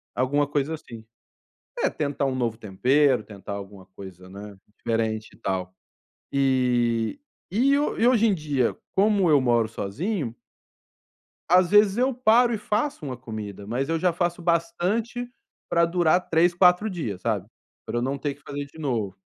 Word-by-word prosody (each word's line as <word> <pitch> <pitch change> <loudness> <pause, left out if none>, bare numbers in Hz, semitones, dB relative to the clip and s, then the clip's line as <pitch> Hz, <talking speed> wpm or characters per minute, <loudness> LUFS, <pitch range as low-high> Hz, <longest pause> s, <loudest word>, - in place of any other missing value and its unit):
alguma 145 +3 +1
coisa 145 +2 -1
assim. 115 -8 -9 0.8
É - - +3
tentar 145 -2 -2
um 130 -1 -1
novo 115 -3 -1
tempero, 125 +6 +2
tentar 100 -1 -9
alguma 100 -1 -9
coisa, 95 -1 -12
né, 100 +1 -10 0.2
diferente 110 -1 -2
e - - -22
tal. 95 -1 -3 0.6
E 125 - +1 0.3
e 270 +8 +3
hoje 240 -5 +3
em 205 - +3
dia, 145 -6 -1 0.2
como 200 -2 +3
eu 150 -2 +6
moro 120 -3 +2
sozinho 120 - -3 1.1
às 180 0 +5
vezes 210 -1 +5
eu 255 +2 +2
paro 240 0 +4
e - - 0
faço 210 - -2
uma 130 - -4
comida, 110 -5 -7
mas 125 +6 -2
eu 165 +1 0
já 180 +1 +2
faço 175 +1 -2
bastante 180 +9 -1 0.4
para 170 0 +3
durar 175 0 +3
3, 170 +2 +3
4 180 +4 +4
dias, 115 - -4
sabe? 105 -2 -1 0.4
Para 120 - -3
eu - - 0
não 135 +3 -1
ter 140 0 -3
que 145 - -26
fazer 145 +1 -6
de 140 +3 -17
novo. 115 - -2
140 Hz, 160 wpm, -25 LUFS, 115-180 Hz, 1.1 s, eu